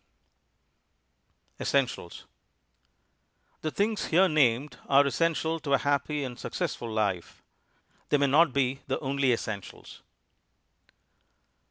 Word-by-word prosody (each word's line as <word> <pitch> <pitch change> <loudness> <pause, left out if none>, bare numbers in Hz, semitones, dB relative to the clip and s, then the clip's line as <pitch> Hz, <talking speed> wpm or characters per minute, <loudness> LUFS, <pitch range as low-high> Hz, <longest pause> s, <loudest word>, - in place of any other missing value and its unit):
_ - - -9
ESSENTIALS 130 -10 -1 1.4
The 155 - -1
things 210 +6 -1
here 185 +4 +4
named 145 -3 +1
are 140 +1 +6
essential 165 +2 0
to 140 -3 -2
a - - +6
happy 145 +1 -1
and 125 -2 -6
successful 120 - -4
life. 100 -5 -2 0.7
They 145 - +4
may 140 - +2
not 150 +3 +4
be 135 0 0
the 135 - -1
only 135 -1 +1
essentials. 105 -5 -5
140 Hz, 110 wpm, -28 LUFS, 125-155 Hz, 1.4 s, are